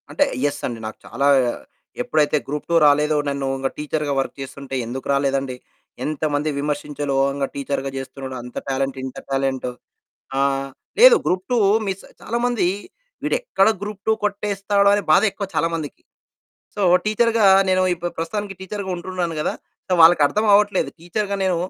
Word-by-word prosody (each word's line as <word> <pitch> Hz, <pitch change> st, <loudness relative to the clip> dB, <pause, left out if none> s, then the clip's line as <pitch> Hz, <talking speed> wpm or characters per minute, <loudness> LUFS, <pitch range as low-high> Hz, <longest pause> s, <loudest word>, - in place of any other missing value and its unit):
అంటే -, -, +2 dB, 0.2 s
యస్ 145 Hz, 0 st, -1 dB
అండి. 120 Hz, -2 st, -5 dB
నాకు 110 Hz, -, -8 dB
చాలా 140 Hz, +4 st, -1 dB, 0.7 s
ఎప్పుడైతే 155 Hz, -11 st, +2 dB
గ్రూప్ 150 Hz, +1 st, -4 dB
2 -, -, +3 dB
రాలేదో 150 Hz, +1 st, +4 dB
నన్ను 140 Hz, -1 st, -2 dB
ఇక 135 Hz, 0 st, -1 dB
టీచర్‌గా 150 Hz, -1 st, -2 dB
వర్క్ 135 Hz, -, -2 dB
చేస్తుంటే 135 Hz, 0 st, -7 dB
ఎందుకు 130 Hz, +3 st, -6 dB
రాలేదండి. 135 Hz, -1 st, 0 dB, 0.5 s
ఎంతమంది 150 Hz, 0 st, -1 dB
విమర్శించాలో 145 Hz, -1 st, -3 dB
ఓహంగా 140 Hz, 0 st, 0 dB
టీచర్‌గా 140 Hz, -1 st, -2 dB
చేస్తున్నాడు, 135 Hz, 0 st, -6 dB
అంత 125 Hz, 0 st, -11 dB
టాలెంట్ 135 Hz, 0 st, -1 dB
ఇంత 130 Hz, -, -7 dB
టాలెంటు. 135 Hz, -2 st, -1 dB, 0.7 s
ఆ! -, -, +3 dB, 0.6 s
లేదు -, -, +9 dB
గ్రూప్ 185 Hz, +1 st, 0 dB
2, -, -, +3 dB, 0.3 s
మిస్ 195 Hz, 0 st, -3 dB, 0.2 s
చాలామంది 235 Hz, -3 st, 0 dB, 0.6 s
వీడెక్కడ 485 Hz, -, +1 dB
గ్రూప్ 205 Hz, -1 st, -6 dB
2 220 Hz, -, +5 dB
కొట్టేస్తాడో 200 Hz, -1 st, +1 dB
అనే 205 Hz, 0 st, +1 dB
బాధ 155 Hz, -, +6 dB
ఎక్కువ 200 Hz, 0 st, -5 dB
చాలామందికి. 165 Hz, -3 st, -2 dB, 0.7 s
సో 210 Hz, -, -5 dB, 0.3 s
టీచర్‌గా 225 Hz, 0 st, +3 dB, 0.2 s
నేను 185 Hz, 0 st, +3 dB
ఇప్పు 175 Hz, 0 st, -4 dB
ప్రస్తుతానికి 200 Hz, +4 st, -3 dB
టీచర్‌గా 190 Hz, 0 st, -5 dB
ఉంటున్నాను 175 Hz, -2 st, -3 dB
గదా! -, -, -1 dB, 0.3 s
సో -, -, -3 dB
వాళ్ళకర్థమవ్వట్లేదు. 200 Hz, +5 st, +4 dB
టీచర్‌గా 200 Hz, +4 st, -2 dB
నేను 185 Hz, -2 st, +1 dB
155 Hz, 140 wpm, -21 LUFS, 140-200 Hz, 0.7 s, లేదు